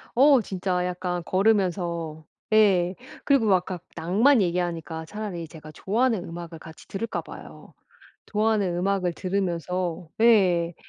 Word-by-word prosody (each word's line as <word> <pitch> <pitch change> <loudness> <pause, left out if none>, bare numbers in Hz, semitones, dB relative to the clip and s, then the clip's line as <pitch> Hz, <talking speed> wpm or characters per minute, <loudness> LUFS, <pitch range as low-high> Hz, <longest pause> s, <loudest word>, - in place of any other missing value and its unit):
어 270 0 +6
진짜 185 -2 -2
약간 180 -1 -3
걸으면서 175 -6 0 0.3
예 190 -4 +4 0.3
그리고 275 -6 +3
막 195 -3 +5
아까 180 0 -6 0.2
낭만 220 - +3
얘기하니까 170 -2 -2
차라리 195 -4 -6
제가 155 -1 -12
좋아하는 220 +2 0
음악을 165 -1 -8
같이 160 -1 -13
들을까 225 +4 -3
봐요. - - -12 0.5
좋아하는 210 -4 0
음악을 185 -1 0
들으면서 180 -2 -2
예 180 -7 +4
180 Hz, 300 characters per minute, -25 LUFS, 170-210 Hz, 0.5 s, 어